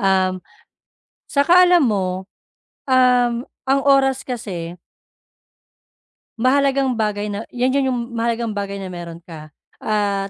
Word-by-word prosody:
Um, 190 -2 +1 0.9
'tsaka 350 +6 +5
alam 350 -4 +5
mo, 190 -5 -1 0.6
um, 250 -2 +3 0.2
ang 275 +1 +3
oras 270 -1 +3
kasi 185 -9 -5 1.7
Mahalagang 270 +1 +2
bagay 210 -2 -2
na 205 - -4
'yan 250 +1 0
yun 275 -1 +1
yung 250 -2 -1
mahalagang 230 -1 -1
bagay 200 -1 -4
na 190 -1 -7
meron 170 -2 -8
ka 155 -3 -11 0.3
at 200 -2 -1
230 Hz, 115 wpm, -20 LUFS, 195-260 Hz, 1.7 s, tsaka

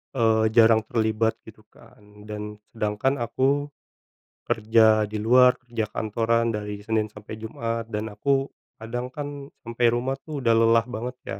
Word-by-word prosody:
eee, 110 -2 +3
jarang 115 -1 +6
terlibat 110 0 0
gitu, 110 -1 -15
kan, 105 0 -18
dan 105 0 -6 0.2
sedangkan 110 +5 -1
aku 135 +5 0 0.8
kerja 110 0 +3
di 110 - -7
luar, 125 +3 +5
kerja 115 -3 -3
kantoran 115 +2 0
dari 105 -1 -5
Senin 110 0 0
sampai 105 +1 -10
Jumat 115 +1 -4
dan 110 0 -4
aku 135 +5 +1 0.4
kadang, 120 +3 -4
kan, 145 -1 -6
sampai 115 +1 -1
rumah, 130 +3 -1
tuh, 150 -3 -5
udah 115 -2 +3
lelah 115 0 +4
banget, 125 +2 -5
ya. 95 - -6
115 Hz, 145 wpm, -24 LUFS, 110-120 Hz, 0.8 s, jarang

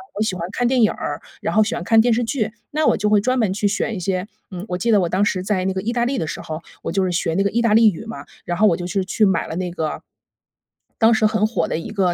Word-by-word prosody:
我 210 - -3
喜 215 -4 0
欢 170 -1 -4
看 245 +2 0
电 250 -2 +3
影 215 - +4
儿， - - -4 0.2
然 - - -2
后 215 - +6
喜 215 - -2
欢 - - -4
看 225 +5 +4
电 235 +1 +4
视 240 +2 +1
剧。 225 -2 -1 0.2
那 305 +1 0
我 - - +4
就 210 - 0
会 210 -1 +5
专 255 +4 0
门 215 -5 +1
去 205 +1 0
选 215 +2 -1
一 - - -4
些 185 +1 -2 0.2
嗯， 180 -1 -6
我 180 - -2
记 230 +6 0
得 205 -3 +5
我 175 - 0
当 195 +4 +2
时 185 -3 0
在 185 -1 -1
那 190 - 0
个 190 - -3
意 220 +4 -2
大 240 0 0
利 260 +1 -1
的 160 - -2
时 - - -5
候， 155 +1 -6 0.2
我 - - -3
就 195 +2 +1
是 185 - 0
学 165 -1 -1
那 195 +4 +1
个 200 - +1
意 230 +4 0
大 230 -2 +3
利 225 0 +7
语 195 +5 -9
嘛， 225 +1 -7 0.2
然 175 - -2
后 215 - +6
我 170 - +2
就 175 - -5
是 185 +2 -1
去 210 +3 +2
买 190 -4 +1
了 - - -5
那 180 0 -3
个， 160 -3 -4 1.0
当 225 0 +5
时 220 -1 +2
很 215 0 +2
火 230 - -1
的 - - -2
一 - - -7
个 190 -4 +1
205 Hz, 340 characters per minute, -21 LUFS, 185-225 Hz, 1.0 s, 利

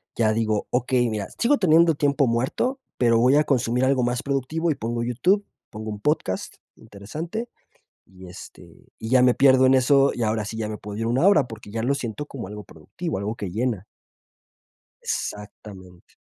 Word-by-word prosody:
ya 110 -2 +2
digo: 110 -2 -1
"Okey, 125 -1 +1
mira, 105 -2 -3
sigo 275 +5 +3
teniendo 165 -2 +4
tiempo 140 -1 +2
muerto, 130 - -1 0.2
pero 115 -2 +3
voy 130 +4 +4
a 150 - +4
consumir 125 -2 +1
algo 130 -2 +2
más 120 0 -1
productivo", 145 +5 -1
y - - -1
pongo 115 -1 -3
YouTube, 180 - +1 0.2
pongo 110 0 -7
un 105 - -7
podcast, 150 -8 -2 0.2
interesante, 155 - -7 0.6
y, 95 0 -14
este, 90 - -14
y 110 - -7
ya 130 -1 +5
me 125 -1 +5
pierdo 130 -1 +5
en 130 +1 +5
eso, 135 +2 +4
y 120 - -3
ahora 110 -1 -1
sí 110 +2 -6
ya 110 -1 -3
me 105 - -5
puedo 105 0 -8
ir 115 - -2
una 130 +11 +2
hora, 150 -11 +4
porque 110 -2 -11
ya 115 0 -3
lo 140 +3 +1
siento 130 +2 -5
como 130 -9 -8
algo 105 +1 -8
productivo, 95 - -6
algo 105 +3 -3
que 100 -5 -6
llena. 110 -2 -2 1.2
Exactamente. 95 -3 -7
120 Hz, 185 wpm, -23 LUFS, 110-140 Hz, 1.2 s, ya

